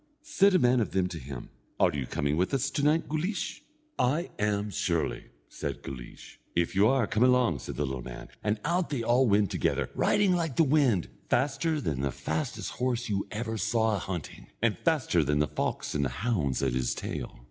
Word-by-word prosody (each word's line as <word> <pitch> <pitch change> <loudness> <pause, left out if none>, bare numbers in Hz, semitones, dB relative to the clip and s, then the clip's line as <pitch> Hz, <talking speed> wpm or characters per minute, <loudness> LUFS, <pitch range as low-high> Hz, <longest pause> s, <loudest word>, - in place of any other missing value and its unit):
Said 200 -11 +4
a - - +8
man 125 -5 +4
of 110 - -1
them 95 -1 +2
to 85 - -6
him: 65 -2 -8 0.3
"Are - - +4
you 70 -4 -3
coming 70 +1 0
with 90 - +1
us 135 +1 0
to - - -1
night, 150 +3 +2
Guleesh?" 175 +5 -2 0.4
"I 150 +8 +1
am 105 0 0
surely," 85 -4 -1 0.2
said - - -5
Guleesh. 65 -3 -9 0.2
"If 85 -1 +1
you 100 +2 +5
are, 130 -2 +3
come 110 - -1
along," 125 - +4
said 65 - -6
the 75 - 0
little 65 -1 -4
man, - - -8
and 105 0 0
out 175 +2 +1
they 140 -5 -1
went - - -4
all 125 +2 +4 0.2
together, - - -1
riding 205 -3 +3
like 165 -6 -1
the 165 - +5
wind, 135 - +3 0.2
faster 150 +3 +1
than 70 - -2
the 70 -1 0
fastest 80 +5 -3
horse 125 -2 -1 0.2
ever 110 +2 -4
you 110 - -2
saw 110 0 +1
a - - -3
hunting, 90 -6 -6
and 115 -3 +2
faster 145 - +2
than 75 +1 +1
the 75 - +3
fox - - -3
and 70 - +1
the - - 0
hounds 75 - -1
at - - +1
his 65 -1 0
tail. - - -5
110 Hz, 205 wpm, -29 LUFS, -, 0.4 s, a